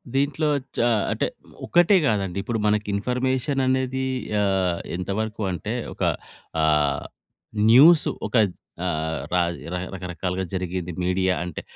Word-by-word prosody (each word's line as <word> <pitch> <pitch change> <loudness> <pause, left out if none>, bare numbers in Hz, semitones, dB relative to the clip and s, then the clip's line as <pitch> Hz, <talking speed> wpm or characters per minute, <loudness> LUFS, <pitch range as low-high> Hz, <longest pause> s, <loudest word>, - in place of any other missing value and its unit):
దీంట్లో 145 +3 +1 0.3
చ - - -1 0.3
అంటే - - 0 0.4
ఒక్కటే 175 +3 +4
గాదండి. 100 -4 -1
ఇప్పుడు 115 -2 -2
మనకి 105 0 +1
ఇన్ఫర్మేషన్ 130 +5 0
అనేది 130 0 0 0.4
ఆహ్, 95 -3 +1 0.2
ఎంతవరకు 105 +4 -3
అంటే 90 -4 -4 0.2
ఒక - - -5 0.6
ఆహ్, 75 -2 +2 0.7
న్యూస్ 155 +6 +8 0.2
ఒక 110 - -6 0.5
ఆహ్, 80 -2 -1
ర 85 0 -1 0.2
రకరకాలుగా 90 +1 -3
జరిగేది. 90 -1 -3
మీడియా 95 0 +1
అంటే 85 - -6
95 Hz, 110 wpm, -24 LUFS, 90-130 Hz, 0.7 s, న్యూస్